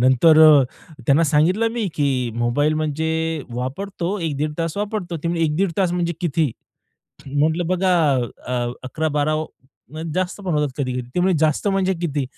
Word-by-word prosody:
नंतर 130 Hz, +6 st, +5 dB
अ, 150 Hz, -3 st, +8 dB, 0.4 s
त्यांना 150 Hz, +4 st, +4 dB
सांगितलं 165 Hz, +9 st, +2 dB
मी, 235 Hz, -3 st, -2 dB
की 130 Hz, -5 st, 0 dB
मोबाईल 135 Hz, +6 st, +1 dB
म्हणजे 160 Hz, 0 st, -1 dB
वापरतो, 175 Hz, +9 st, -3 dB
1-1.30 150 Hz, -1 st, -2 dB
तास 165 Hz, +2 st, -2 dB
वापरतो. 205 Hz, -5 st, -3 dB
ते 165 Hz, +2 st, -4 dB
म्हणले, 170 Hz, -1 st, 0 dB
"1-1.30 170 Hz, +4 st, 0 dB
तास 180 Hz, -3 st, +2 dB
म्हणजे 175 Hz, -1 st, 0 dB
किती?" 160 Hz, -4 st, 0 dB, 0.8 s
म्हटलं 155 Hz, +5 st, 0 dB
बघा 185 Hz, 0 st, +2 dB, 0.5 s
अ, 120 Hz, -1 st, -1 dB
11-12 155 Hz, +2 st, 0 dB
वा 155 Hz, 0 st, -2 dB, 0.5 s
म्हणजे 160 Hz, +1 st, -5 dB
जास्त 185 Hz, +2 st, -2 dB
पण 180 Hz, -, -1 dB
होतात 150 Hz, -1 st, +1 dB
कधी 130 Hz, -2 st, -1 dB
कधी. 125 Hz, -, -2 dB
ते 180 Hz, -, +1 dB
म्हणे 185 Hz, 0 st, +3 dB
जास्त 155 Hz, +5 st, +1 dB
म्हणजे 195 Hz, -1 st, +1 dB
किती? 150 Hz, -5 st, -1 dB
160 Hz, 165 wpm, -21 LUFS, 145-175 Hz, 0.8 s, अ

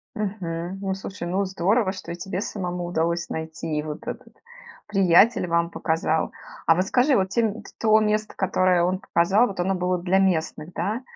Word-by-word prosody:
Мгм. 190 Hz, -4 st, -4 dB
Ну, 195 Hz, -1 st, -2 dB
слушай, 195 Hz, -2 st, -6 dB
ну 190 Hz, +3 st, 0 dB
здорово, 190 Hz, +3 st, +1 dB
что 185 Hz, -3 st, -8 dB
и -, -, -4 dB
тебе 185 Hz, +1 st, -4 dB
самому 180 Hz, -4 st, -4 dB
удалось 170 Hz, 0 st, -1 dB
найти, 160 Hz, -1 st, -4 dB
и -, -, 0 dB
вот 150 Hz, -1 st, -7 dB
этот -, -, -7 dB, 0.5 s
приятель 195 Hz, +1 st, +4 dB
вам 170 Hz, 0 st, +1 dB
показал. 160 Hz, -1 st, 0 dB, 0.4 s
А 165 Hz, -, +6 dB
вот 185 Hz, +2 st, +1 dB
скажи, 255 Hz, +6 st, +3 dB
вот 190 Hz, -3 st, +1 dB
те 225 Hz, +1 st, +1 dB, 0.3 s
то 220 Hz, -1 st, +5 dB
место, 215 Hz, 0 st, 0 dB
которое 185 Hz, -2 st, +2 dB
он 185 Hz, +2 st, 0 dB
показал, 195 Hz, +7 st, +3 dB
вот 195 Hz, -2 st, -7 dB
оно 190 Hz, +2 st, +1 dB
было 180 Hz, 0 st, 0 dB
для 185 Hz, +2 st, +1 dB
местных, 170 Hz, -3 st, 0 dB
да? 220 Hz, +5 st, -2 dB
185 Hz, 175 wpm, -24 LUFS, 170-200 Hz, 0.5 s, А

